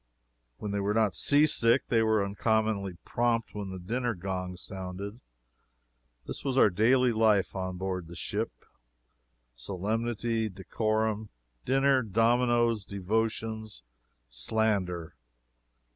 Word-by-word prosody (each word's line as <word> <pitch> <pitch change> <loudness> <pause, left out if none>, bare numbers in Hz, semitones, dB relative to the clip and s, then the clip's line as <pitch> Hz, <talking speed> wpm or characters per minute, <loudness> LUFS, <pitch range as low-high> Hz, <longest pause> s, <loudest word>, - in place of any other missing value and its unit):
When 105 - -4
they 100 - -1
were 100 +1 0
not 110 -4 +3
seasick 135 - +3
they 115 -2 +3
were 110 -2 +2
uncommonly 100 -2 0
prompt 115 -1 0
when 105 -2 -5
the 95 - -6
dinner 120 +6 -2
gong 90 0 -4
sounded. 95 +4 -6 1.1
Such - - -6
was 135 -2 -1
our 105 - +6
daily 125 +6 +4
life 110 -4 +3
on 95 -1 -3
board 90 -2 -3
the 85 - -10
ship 80 - -4 0.9
solemnity, 110 - -2
decorum, 110 +2 -1 0.4
dinner, 135 0 +3
dominoes, 115 +1 +2
devotions, 110 - -2 0.4
slander. 90 - -1
110 Hz, 110 wpm, -29 LUFS, 95-115 Hz, 1.1 s, our